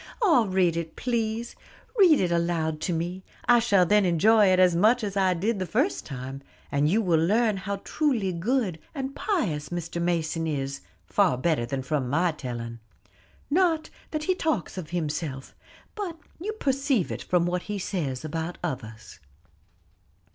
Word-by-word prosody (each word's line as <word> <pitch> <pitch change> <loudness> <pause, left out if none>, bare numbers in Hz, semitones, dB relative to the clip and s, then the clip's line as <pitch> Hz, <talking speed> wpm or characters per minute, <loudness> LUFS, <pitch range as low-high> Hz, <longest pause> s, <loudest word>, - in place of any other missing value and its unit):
"Ah, 325 - +4
read 185 -3 +2
it, 165 -1 -4
please; 230 -1 -2 0.4
read 365 -9 +6
it 180 -2 +1
aloud 170 -2 0
to - - -1
me; 175 +3 -3 0.2
I 240 0 +6
shall 200 -6 +4
then 210 +4 +4
enjoy 205 +5 +5
it 185 0 +4
as 180 -2 +5
much 220 +7 +4
as 200 -1 -3
I 190 -2 +3
did 205 +5 -1
the 185 - -2
first 260 - 0
time; 135 0 -6 0.3
and 145 +1 +2
you 220 +6 +2
will 165 -4 +3
learn 215 +4 +3
how 200 +1 -3
truly 240 - 0
good 190 -1 0 0.2
and 270 -1 -4
pious 190 - -1
Mr. 170 -1 -4
Mason 165 -1 0
is, 135 -3 -3 0.2
far 190 -10 +2
better 130 -4 0
than 130 +1 -3
from 135 -2 -1
my 170 +5 +2
telling. 120 -5 -6 0.7
Not 330 -1 +2 0.2
that 310 -1 -3
he 370 - +2
talks 315 - -1
of 180 -5 -6
himself, 150 -5 -3 0.4
but 380 -6 -5 0.2
you 420 +6 -3
perceive 275 - 0
it - - -4
from 175 -1 +1
what 180 0 -1
he 210 - -2
says 155 -9 -3
of 155 - -7
others." 160 -9 -5
180 Hz, 165 wpm, -26 LUFS, 160-230 Hz, 0.7 s, read